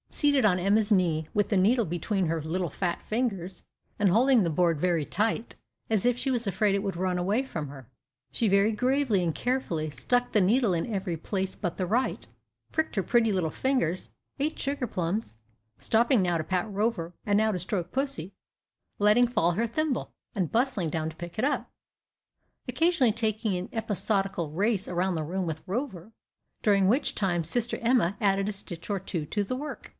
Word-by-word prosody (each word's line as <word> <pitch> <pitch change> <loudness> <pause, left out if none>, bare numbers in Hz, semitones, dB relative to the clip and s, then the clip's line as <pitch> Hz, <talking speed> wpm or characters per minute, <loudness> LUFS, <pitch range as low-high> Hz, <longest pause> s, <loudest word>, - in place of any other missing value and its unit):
Seated 285 -3 +3
on 185 -4 +4
Emma's 205 +4 +2
knee, 165 -5 +2
with 205 -1 +1
the 210 - +1
needle 225 +5 +3
between 180 +3 -1
her 165 0 -1
little 170 +3 -2
fat 175 +1 -2
fingers, 195 -6 -2 0.3
and 205 -2 +3
holding 240 +3 +4
the 170 - +1
board 165 -1 +2
very 170 -3 +1
tight, 220 +6 -1 0.3
as 220 -2 +1
if 245 -1 +3
she 270 - -1
was 240 -2 -1
afraid 200 0 +1
it - - +1
would 195 -4 -3
run 185 0 0
away 200 +8 +1
from 160 - -5
her, 135 -4 -11 0.4
she 230 - +1
very 200 +2 +4
gravely 250 -3 +1
and 165 -2 0
carefully 180 -12 -1
stuck 245 +11 0
the 210 - +3
needle 215 +2 +3
in 170 +7 -2
every 190 -3 -2
place 190 +3 -3
but 175 - -4
the 185 - 0
right 235 +8 -1 0.4
pricked 315 -4 -1
her 195 - +1
pretty 230 0 +3 0.2
fingers 250 - -1 0.3
ate 305 +3 -1
sugar 275 -2 -1
plums 185 - -3 0.4
stopping 235 - +3
now 175 -2 +1
to 160 - -2
pat 185 +5 -1
Rover, 200 -4 -1
and 205 -1 +3
now 220 +1 +3
to 185 - -2
stroke 180 -1 -2
pussy 260 - -3 0.7
letting 210 +4 +5
fall 175 -8 +2
her 225 +7 0
thimble, 300 +3 -2 0.2
and 185 -6 -1
bustling 230 -8 +1
down 160 0 -2
to 160 - -11
pick 175 +4 -8
it 245 - +2
up 290 - -1 1.0
occasionally 330 -9 +2
taking 215 -2 -1
an 180 +3 -4
episodical 200 -6 -1
race 200 +4 0
round 180 +1 0
the 160 - -2
room 180 +4 -2
with 160 -1 -4
Rover, 200 - -4 0.5
during 200 -3 +4
which 255 +8 +1
time 175 -4 0
Sister 235 +9 -1
Emma 230 -6 +2
added 195 -1 +2
a - - -1
stitch 185 -4 -6
or 200 -1 0
two 175 -4 -4
to 205 +5 -1
the 225 +6 -3
work. 295 +3 -6
200 Hz, 190 wpm, -28 LUFS, 175-235 Hz, 1.0 s, letting